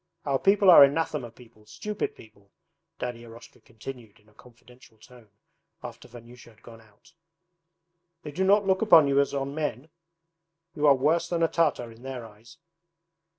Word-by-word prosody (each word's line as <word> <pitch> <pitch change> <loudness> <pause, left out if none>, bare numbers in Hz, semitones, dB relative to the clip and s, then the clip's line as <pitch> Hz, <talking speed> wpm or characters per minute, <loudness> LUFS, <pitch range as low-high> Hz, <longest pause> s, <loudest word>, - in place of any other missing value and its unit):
Our 135 -2 -1
people 195 -1 +4
are 165 - +9
anathema 145 -3 -1
people; 115 -2 -20
stupid 210 - -5
people,' 100 -2 -19 0.5
Daddy 120 -1 -6
Eroshka 115 0 -15
continued 115 -1 -12
in 105 - -30
a - - -27
confidential 125 0 -20
tone 120 0 -19 0.5
after - - -10
Vanyusha 120 0 -15
had 110 +1 -24
gone 115 -1 -14
out. 110 +10 -25 1.1
'They 150 - -8
do 185 +6 -2
not 200 +2 +3
look 190 -1 0
upon 165 -9 +6
you 140 0 +2
as 140 0 0
on 140 0 -4
men, 150 -2 -5 0.8
you 150 -1 0
are 140 - +6
worse 160 +6 0
than 170 -1 -1
a - - +4
Tartar 150 -8 -1
in 115 +1 -17
their 130 -2 -8
eyes. 110 +2 -17
130 Hz, 165 wpm, -26 LUFS, 115-155 Hz, 1.1 s, are